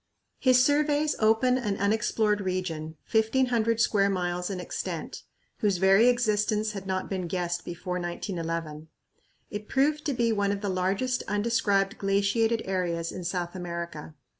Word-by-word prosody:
His 255 -1 +5
surveys 295 +1 +2
opened 225 +4 +3
an 205 -5 -2
unexplored 210 0 +1
region, 175 -4 -3 0.2
1500 230 0 +2
square 200 -3 +3
miles 180 -1 -2
in 190 -2 -4
extent, 180 - -5 0.4
whose 200 -3 +1
very 195 +5 +5
existence 215 -3 +1
had 195 -2 -7
not 185 0 -2
been 185 -3 -3
guessed 175 0 -2
before 180 +1 -4
1911. 165 -3 -4 0.6
It 210 0 -6
proved 300 +3 +1
to 290 - 0
be 235 -1 +2
one 200 -2 +1
of 200 0 -3
the 205 - -2
largest 195 +8 0
undescribed 205 -1 +1
glaciated 200 +4 +1
areas 175 -3 -1
in 180 - -6
South 175 0 -3
America. 170 -3 -6
200 Hz, 140 wpm, -27 LUFS, 180-225 Hz, 0.6 s, His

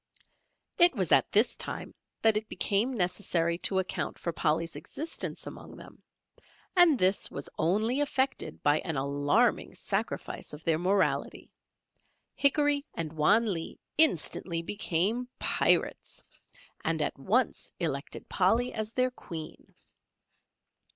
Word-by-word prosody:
It 345 -4 +6
was 185 -7 -1
at - - +4
this 215 +4 +3
time - - -6 0.3
that 220 -1 +5
it 215 0 -3
became 210 +6 +1
necessary 175 -3 0
to 190 - 0
account 190 -1 -2
for 170 - -4
Polly's 160 +2 -1
existence 320 +2 -4
among - - -10
them, - - -14 0.7
and 350 -6 +6
this 190 -1 +3
was 140 - -6
only 215 - +1
effected 275 -2 -1
by 145 +1 +3
an 160 -4 -3
alarming 140 +1 +1
sacrifice - - -4
of 150 +1 -10
their 160 -1 +1
morality; 190 +2 0 0.8
Hickory 290 0 +3
and 160 -2 -4
Wan 200 +8 +3
Lee 165 -2 -6 0.2
instantly 170 - +2
became 205 +6 -1
Pirates, - - +1 0.6
and - - 0
at - - -2
once - - 0
elected - - -3
Polly 245 +2 +1
as 220 0 -3
their 255 0 +1
Queen. 165 -9 -8
195 Hz, 125 wpm, -29 LUFS, 165-245 Hz, 0.8 s, It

